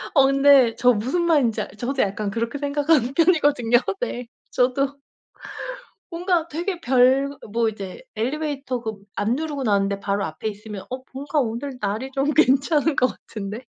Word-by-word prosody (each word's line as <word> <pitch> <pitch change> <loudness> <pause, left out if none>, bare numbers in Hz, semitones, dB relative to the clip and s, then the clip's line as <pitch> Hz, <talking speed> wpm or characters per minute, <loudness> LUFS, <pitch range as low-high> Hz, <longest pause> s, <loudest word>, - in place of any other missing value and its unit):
어 275 -2 +7
근데 275 -3 +5
저 250 0 +4
무슨 260 +11 -1
말인지 285 -10 +2
알 - - -5
저도 250 +5 -1
약간 205 +1 -2
그렇게 230 +6 -3
생각하는 285 -2 +1
편이거든요. 290 -8 +4 0.2
네. 250 - -3 0.2
저도 275 +3 +1 1.1
뭔가 345 -1 0
되게 345 +3 -3
별 255 -4 +5 0.4
뭐 230 0 +2
이제 200 -3 -8
엘리베이터 275 +1 -2
그 220 -2 -4 0.2
안 220 +4 0
누르고 295 -2 -3
나왔는데 200 -3 +1
바로 200 0 -1
앞에 155 +6 -5
있으면 210 -1 -7
'어 255 +1 -6
뭔가 285 +3 -1
오늘 250 +2 -3
날이 215 +6 -2
좀 275 +2 0
괜찮은 290 +2 +3
것 255 - +4
같은데.' 215 -1 -7
260 Hz, 320 characters per minute, -23 LUFS, 225-290 Hz, 1.1 s, 어